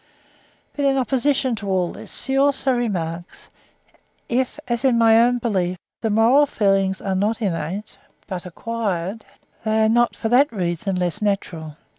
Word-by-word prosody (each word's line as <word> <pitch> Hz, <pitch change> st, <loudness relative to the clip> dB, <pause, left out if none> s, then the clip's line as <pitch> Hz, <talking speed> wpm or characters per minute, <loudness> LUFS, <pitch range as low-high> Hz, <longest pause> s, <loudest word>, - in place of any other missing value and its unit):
But 285 Hz, -, -2 dB
in 275 Hz, -1 st, +3 dB
opposition 265 Hz, 0 st, +1 dB
to 200 Hz, -1 st, -5 dB
all 185 Hz, -2 st, +1 dB
this, -, -, -5 dB
he 265 Hz, -, -1 dB
also 270 Hz, -1 st, +2 dB
remarks, 175 Hz, -8 st, -4 dB, 0.8 s
"if, 255 Hz, +4 st, -1 dB
as 240 Hz, 0 st, -2 dB
in 255 Hz, -3 st, +3 dB
my 225 Hz, 0 st, +6 dB
own 245 Hz, +1 st, +3 dB
belief, 190 Hz, -7 st, -1 dB, 0.2 s
the 225 Hz, -, 0 dB
moral 235 Hz, +7 st, +4 dB
feelings 195 Hz, -4 st, +1 dB
are 195 Hz, -, -1 dB
not 210 Hz, +4 st, 0 dB
innate, 195 Hz, 0 st, -3 dB, 0.3 s
but 185 Hz, -2 st, -6 dB
acquired, 205 Hz, 0 st, -3 dB, 0.4 s
they 220 Hz, 0 st, +1 dB
are 220 Hz, -, +3 dB
not 240 Hz, +1 st, +2 dB
for 225 Hz, -, -3 dB
that 270 Hz, +5 st, +4 dB
reason 185 Hz, -1 st, -2 dB
less 180 Hz, +3 st, -1 dB
natural." 170 Hz, -7 st, -2 dB
220 Hz, 155 wpm, -22 LUFS, 185-245 Hz, 0.8 s, my